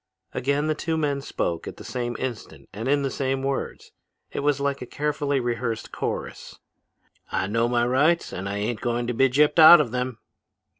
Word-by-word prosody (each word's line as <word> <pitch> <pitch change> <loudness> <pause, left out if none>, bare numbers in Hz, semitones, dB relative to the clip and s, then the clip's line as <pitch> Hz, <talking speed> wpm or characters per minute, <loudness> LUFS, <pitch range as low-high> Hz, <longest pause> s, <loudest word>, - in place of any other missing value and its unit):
Again 140 +3 0
the 155 - +1
two 160 +1 -2
men 145 -3 -1
spoke 85 -10 -3
at - - -7
the - - -10
same 120 -1 -4
instant 125 -4 -6
and 110 +5 -5
in 140 +1 +2
the 135 - -1
same 135 0 -2
words. 135 0 -4 0.4
It - - -4
was 145 -1 +1
like 140 0 -1
a 125 - -6
carefully 145 -1 -1
rehearsed 120 -2 -3
chorus. - - -5 0.7
'I - - 0
know 115 +2 +1
my 120 -1 +2
rights, 150 +8 +2
and 95 +2 -4
I 100 - -3
ain't 105 +2 -2
going 120 0 -1
to 125 - -2
be 135 +3 +3
gypped 150 +5 +3
out 160 +2 +11
of 115 - 0
them!' 125 -1 -3
130 Hz, 195 wpm, -24 LUFS, 120-145 Hz, 0.7 s, out